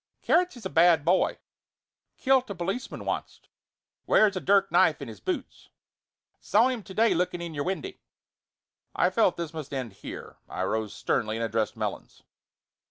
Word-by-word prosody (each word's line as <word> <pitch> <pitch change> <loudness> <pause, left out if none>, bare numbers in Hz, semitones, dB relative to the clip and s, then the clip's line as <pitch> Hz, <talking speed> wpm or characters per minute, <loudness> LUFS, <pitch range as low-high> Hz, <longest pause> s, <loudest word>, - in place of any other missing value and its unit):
"Carrots 360 -6 +2
is 225 - -12
a - - -2
bad 165 -2 +5
boy. 185 +2 +2 0.8
Killed 260 -1 +2
a 200 - -4
policeman 195 +8 -4
onct. - - -4 0.6
Wears 210 -2 +4
a - - -1
dirk 195 +1 +3
knife 165 -2 +4
in 140 - -7
his 110 -4 -10
boots. - - -5 0.7
Saw 225 +6 +3
him 250 -3 -3
to 190 -2 -12
day 225 +1 +4
looking 175 0 -1
in 170 -1 -6
your 145 -1 -3
windy." 195 - -4 0.9
I - - +2
felt 220 -5 +2
that 170 - -1
this 165 0 -9
must 155 -3 -7
end 130 -6 -4
here. - - -9
I - - -3
rose 110 +2 -1
sternly 110 0 -1
and 115 - -1
addressed 110 0 -1
Melons. - - -5
175 Hz, 170 wpm, -27 LUFS, 140-210 Hz, 0.9 s, bad